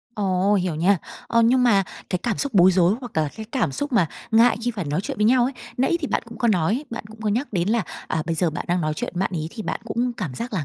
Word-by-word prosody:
Ồ, 195 -1 +1
hiểu 180 -4 0
nha. 180 +5 +3 0.3
Ờ, 230 0 +3
nhưng 250 +3 +4
mà 210 -6 +4 0.3
cái 180 - 0
cảm 235 -5 -1
xúc 280 -4 -2
bối 185 -1 +6
rối 180 +1 +4
hoặc 245 -3 -8
là 155 -1 +2
cái 220 - -7
cảm 240 - 0
xúc 285 - -3
mà 205 -8 +4 0.2
ngại 230 +2 +5
khi 240 - 0
phải 205 -6 -4
nói 150 +3 -1
chuyện - - -5
với 210 - +2
nhau 245 +2 +5
ấy, 260 - -1 0.2
nãy 265 +7 +2
thì 300 - -2
bạn - - -1
cũng 230 -1 -10
có 235 - +2
nói, 210 - +1
bạn 230 - -5
cũng 220 +1 -14
có 215 - -1
nhắc 235 +7 -1
đến 180 -1 0
là, 225 0 +2 0.2
à, 160 - -1
bây 165 - 0
giờ 165 0 +1
bạn 155 - -5
đang 175 +1 +1
nói 155 -1 0
chuyện - - -4
với - - -4
bạn 190 - 0
ấy, 160 -1 -3
thì 220 - -7
bạn - - -3
cũng 240 +1 -1
cảm 185 - -5
giác 235 - -5
là 175 -8 -1
210 Hz, 300 wpm, -23 LUFS, 175-235 Hz, 0.3 s, bối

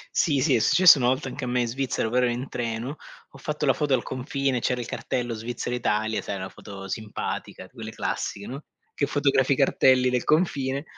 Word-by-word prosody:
Sì, 140 -5 +2
sì, 145 -2 +3
è - - +3
successo 175 +4 +7
una 120 - +2
volta 130 +3 0
anche 140 - -6
a - - -2
me 125 0 +1
in 120 - 0
Svizzera, 130 -2 -1
però 125 +2 +2
ero - - 0
in 125 +3 -4
treno, 120 +4 -4 0.3
ho - - -14
fatto 150 +1 -3
la 135 - +4
foto 145 -1 +1
al 120 - -2
confine, 130 0 -2
c'era 125 +1 0
il 120 - -4
cartello 120 0 -3
Svizzera 120 +2 -4
Italia, 110 -2 0
sai 100 - -4
una 95 0 -5
foto 95 0 -10
simpatica, 110 +1 -5
quelle - - -9
classiche, 100 0 -3
no, 135 +3 -7 0.3
che 140 - 0
fotografi 140 -2 +2
cartelli 130 -2 +4
del 125 -1 0
confine, 140 -4 +1
125 Hz, 210 wpm, -25 LUFS, 115-140 Hz, 0.3 s, successo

